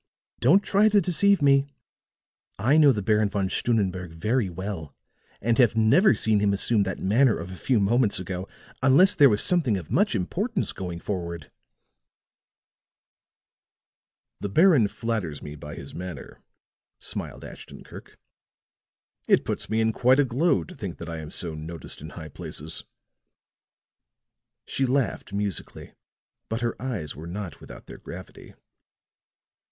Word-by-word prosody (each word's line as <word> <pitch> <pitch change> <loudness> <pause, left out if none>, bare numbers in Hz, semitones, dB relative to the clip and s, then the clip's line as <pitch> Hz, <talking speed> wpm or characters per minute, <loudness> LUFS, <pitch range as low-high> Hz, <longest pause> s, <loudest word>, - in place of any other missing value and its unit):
Don't 175 +12 +4
try 205 +3 +3
to 210 -1 +4
deceive 195 0 +2
me. 140 0 +4 0.9
I 120 +9 +2
know 150 -3 +7
the 105 -5 -2
Baron 105 0 +2
Von 100 -1 -1
Stunnenberg 95 -7 -1
very 105 +5 0
well, 90 -4 -6 0.4
and 115 +3 0
have 120 -3 +4
never 145 - +5
seen 110 -2 +1
him 100 -1 +2
assume 105 +2 +2
that 95 -2 -2
manner 115 +4 +3
of 85 +2 -7
a - - -7
few 120 +5 +1
moments 110 +2 +2
ago 90 +1 -5 0.3
unless 145 +10 +6
there 145 -3 +6
was 105 -2 +4
something 150 - +2
of 85 -5 -8
much 205 - +2
importance 190 - -2
going 90 -2 -6
forward." 85 -5 -5 2.9
"The 100 - -4
Baron 155 - +5
flatters 100 -10 -4
me 75 - -8
by 75 0 -9
his - - -10
manner," 90 -4 -8 0.6
smiled - - -6
Ashton - - -11
Kirk. - - -13 1.1
"It - - +3
puts - - -4
me 110 +1 +1
in 110 0 +1
quite 130 +4 +3
a 145 - +4
glow 140 +6 +1
to 180 - -12
think 100 - -7
that 85 - -8
I 85 -1 -5
am 75 -1 -8
so 85 -3 -3
noticed 80 0 -7
in 80 - -8
high 80 -2 -9
places." - - -6 1.8
She 135 - -1
laughed 130 -5 -1
musically; 100 -1 -4 0.6
but 115 +1 -3
her 120 -1 -1
eyes 105 - -4
were 80 +3 -9
not 90 -4 -7
without - - -12
their - - -11
gravity. - - -11
105 Hz, 145 wpm, -25 LUFS, 90-135 Hz, 2.9 s, know